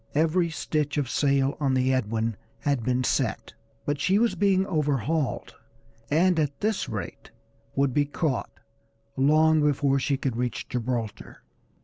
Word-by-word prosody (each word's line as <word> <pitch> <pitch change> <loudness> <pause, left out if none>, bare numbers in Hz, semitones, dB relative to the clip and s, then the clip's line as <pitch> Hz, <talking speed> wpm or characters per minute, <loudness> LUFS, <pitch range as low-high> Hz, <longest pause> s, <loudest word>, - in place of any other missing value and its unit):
Every 165 +3 +2
stitch 150 -1 -2
of 140 -4 -1
sail 140 -1 +2
on 135 -3 +1
the 130 0 +2
Edwin 115 -2 -1 0.3
had 140 -4 0
been 125 +1 +1
set, - - -1 0.3
but 145 -1 -1
she 190 +2 +3
was 235 +1 +2
being 195 -2 +2
overhauled, 150 - -1 0.6
and 170 +3 +3
at 145 -2 -1
this 215 -1 -1
rate - - -6 0.5
would 140 -2 +1
be 145 +2 +2
caught 145 -2 -2 0.7
long 155 +3 +4
before 140 -2 +2
she 135 +1 0
could 130 -3 -2
reach 125 0 -3
Gibraltar. 115 -3 -4
145 Hz, 140 wpm, -26 LUFS, 130-155 Hz, 0.7 s, long